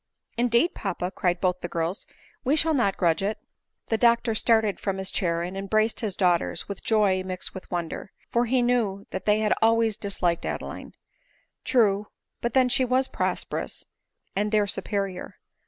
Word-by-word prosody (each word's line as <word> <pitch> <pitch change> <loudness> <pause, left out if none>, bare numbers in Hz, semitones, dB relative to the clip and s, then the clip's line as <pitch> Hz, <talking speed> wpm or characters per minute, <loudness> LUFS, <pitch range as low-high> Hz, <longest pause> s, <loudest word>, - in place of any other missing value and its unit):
" - - -59
Indeed, 240 +7 +3
papa," 185 -2 -3
cried 180 -3 0
both 180 -1 +1
the 175 - -4
girls, 170 +3 -3 0.2
" - - -31
we 275 +3 +2
shall 320 +1 +3
not 240 -9 +1
grudge 170 -2 +2
it." 210 +2 -1
VV - - -42 0.4
The 225 - +2
doctor 235 0 +3
started 220 -2 +2
from 195 -1 -2
his 190 0 -3
chair 170 -2 0
and 180 +2 -5
embraced 215 +3 0
his 210 -5 -1
daughters 180 -3 +1
with 200 - -6
joy 205 -4 +3
mixed 185 -1 -2
with 190 - -9
wonder; 175 +2 -4 0.2
for 235 +1 +2
he 250 +1 +2
knew 220 -5 0
they 210 +3 +1
had 215 - +3
always 225 -1 +3
disliked 180 -5 -1
Adeline. - - -5 0.7
*True; 210 -5 +2 0.3
but 235 -1 -2
then 260 -1 +5
she 255 +1 +3
was 255 +1 +2
prosperous, - - -3 0.5
and 210 +1 0
their 210 -1 +3
superior. 195 -2 -3
205 Hz, 175 wpm, -26 LUFS, 185-230 Hz, 0.7 s, then